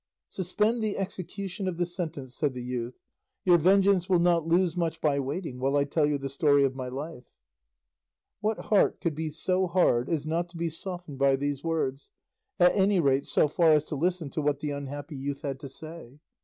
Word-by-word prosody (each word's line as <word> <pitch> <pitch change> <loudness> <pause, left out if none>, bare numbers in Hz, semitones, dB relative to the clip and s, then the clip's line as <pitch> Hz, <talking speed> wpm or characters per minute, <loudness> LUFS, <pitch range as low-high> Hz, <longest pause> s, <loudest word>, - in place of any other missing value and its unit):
"Suspend 210 +5 0
the 215 -2 -1
execution 195 0 -4
of 180 -3 -2
the 175 - +1
sentence," 160 -7 -6
said 140 -1 -1
the 125 - -5
youth; 125 -1 -4 0.5
"your 175 -2 +6
vengeance 190 +1 +4
will 185 - +5
not 170 -2 +2
lose 175 0 +2
much 165 -2 -1
by 145 -3 +1
waiting 140 -1 -4
while 135 +2 +1
I 140 - +3
tell 145 +1 +1
you 150 -1 +1
the 135 0 -4
story 140 +1 +3
of 135 -1 +1
my 130 -1 -5
life." 135 0 -6 1.1
What 215 +1 0
heart 205 - +4
could 170 - -1
be 155 +1 -3
so 185 +4 0
hard 150 -9 +2
as 155 -3 -1
not 170 +2 -1
to 170 - -11
be 170 0 -1
softened 175 -4 -7
by 135 -1 +4
these 140 0 -3
words, 150 -4 -2 0.5
at 180 0 +5
any 195 -1 +3
rate 140 -3 +2
so - - +3
far 160 +1 +4
as 150 - +2
to - - -2
listen 170 -1 -1
to 155 - -2
what 145 -1 0
the 150 0 -3
unhappy 145 +1 -6
youth 140 +2 -4
had 135 -2 -3
to 140 -2 -8
say? 155 -2 -10
160 Hz, 205 wpm, -28 LUFS, 140-180 Hz, 1.1 s, your